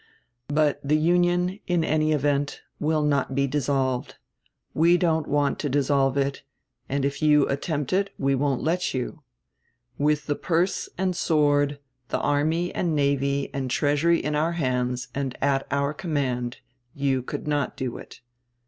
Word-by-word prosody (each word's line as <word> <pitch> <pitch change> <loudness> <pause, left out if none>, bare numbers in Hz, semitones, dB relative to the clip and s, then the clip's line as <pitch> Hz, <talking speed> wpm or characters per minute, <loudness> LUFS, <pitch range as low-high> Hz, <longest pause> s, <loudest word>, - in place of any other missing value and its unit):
But 150 0 +1
the 150 +2 +2
Union, 175 +3 +2
in 175 -2 +2
any 155 0 +1
event, 145 -1 0 0.2
will 155 0 +1
not 140 -2 +1
be 140 0 +2
dissolved. 135 -2 -1 0.6
We 170 +3 +4
don't 160 -4 +1
want 145 -1 +1
to 145 - -2
dissolve 140 -1 +2
it, 140 0 -1 0.5
and 140 0 0
if 140 0 -2
you 150 -2 +4
attempt 145 +1 -2
it 195 +1 +2
we 135 -1 +1
won't 135 -1 0
let 170 0 0
you. 130 +5 -4 0.8
With 150 0 +1
the 145 - 0
purse 175 +4 0
and 185 0 0
sword, 145 -3 +2 0.3
the - - -1
army 155 +4 0
and 170 -3 0
navy 140 -1 0
and 135 -2 -3
treasury 150 +5 +2
in 150 - -2
our 160 +3 +1
hands 125 -5 -1
and 135 -2 -3
at 135 -1 +1
our 140 +1 0
command, 135 -9 -2 0.3
you 135 -2 +1
could 125 - -6
not 145 -3 -1
do 130 -2 -3
it. - - -13
145 Hz, 155 wpm, -25 LUFS, 140-155 Hz, 0.8 s, We